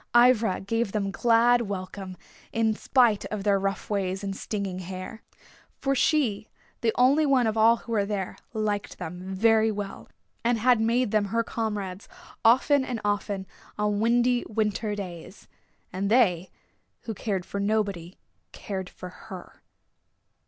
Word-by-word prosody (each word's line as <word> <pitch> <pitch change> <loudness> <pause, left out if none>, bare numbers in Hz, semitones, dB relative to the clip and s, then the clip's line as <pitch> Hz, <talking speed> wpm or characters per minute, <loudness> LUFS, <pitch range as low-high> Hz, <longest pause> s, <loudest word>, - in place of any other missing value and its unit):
Ivra 240 -5 +4
gave 225 +1 -1
them 200 -2 -1
glad 240 +2 +4
welcome 190 -2 -6 0.3
in 225 -1 +1
spite 230 -2 +3
of 210 -2 -4
their 200 -1 +3
rough 195 0 -2
ways 195 -1 -2
and 195 -1 -3
stinging 195 -3 -4
hair. 185 +4 -7 0.6
For 275 - 0
she, 255 -7 +1 0.3
the 230 - +2
only 270 +5 +4
one 265 -3 +4
of 220 -1 0
all 225 +1 +5
who 230 - -11
were 205 -3 +1
there, 200 -3 -3 0.2
liked 215 -2 -2
them 180 +2 -7
very 220 +2 +4
well 205 -1 -6 0.3
and 235 0 +2
had 240 0 +3
made 235 0 +1
them 215 -2 +2
her 230 +4 0
comrades 210 -5 -4 0.3
often 265 +4 +5
and 250 -3 -3
often 205 -1 -1 0.3
on 210 -1 0
windy 240 +2 +2
winter 215 0 -1
days. 185 -1 -8 0.5
And 195 +2 -1
they, 190 -7 +3 0.5
who 225 - -5
cared 195 -3 -3
for 200 - -5
nobody, 200 -4 -1 0.3
cared 190 -3 -5
for 180 - -9
her. 185 0 -11
210 Hz, 145 wpm, -26 LUFS, 195-230 Hz, 0.6 s, all